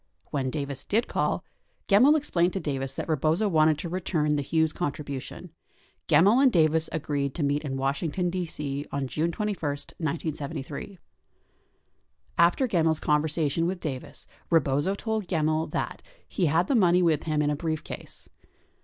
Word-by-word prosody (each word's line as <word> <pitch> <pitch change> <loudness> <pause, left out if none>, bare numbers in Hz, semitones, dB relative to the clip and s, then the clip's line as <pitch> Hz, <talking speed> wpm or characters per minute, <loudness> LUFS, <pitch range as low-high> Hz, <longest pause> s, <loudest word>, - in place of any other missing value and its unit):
When 135 -3 -1
Davis 140 -1 -4
did 225 +4 0
call, - - -1 0.4
Gemmill 250 +10 +6
explained 180 - +1
to 195 - -1
Davis 135 -4 -3
that - - -4
Rebozo 160 +6 +1
wanted 155 -4 +4
to 160 - -5
return 165 -4 0
the 145 - 0
Hughes 160 +2 +1
contribution. 145 +1 -5 0.6
Gemmill 195 - +5
and 270 -2 +6
Davis 160 -3 +3
agreed 145 -3 -2
to 160 - -1
meet 145 +1 0
in 135 -3 -3
Washington, 145 +6 -1
D.C., 150 -5 -4
on 140 -1 -2
June 160 +6 -1
21, 210 +1 -2
1973. 145 -1 -4
64 195 -3 -11 1.4
After 175 +10 +4
Gemmill 165 -7 +2
's - - -8
conversation 155 +1 +1
with 185 0 -2
Davis, 135 -7 -6 0.2
Rebozo 150 +3 +2
told 220 -2 -3
Gemmill 155 -2 +1
that, - - -3 0.3
he 180 - 0
had 165 +4 +2
the 275 - 0
money 180 -6 +4
with 160 -3 +2
him 155 -2 +1
in 145 - +1
a - - 0
briefcase. 155 0 -5
160 Hz, 155 wpm, -27 LUFS, 145-180 Hz, 1.4 s, Gemmill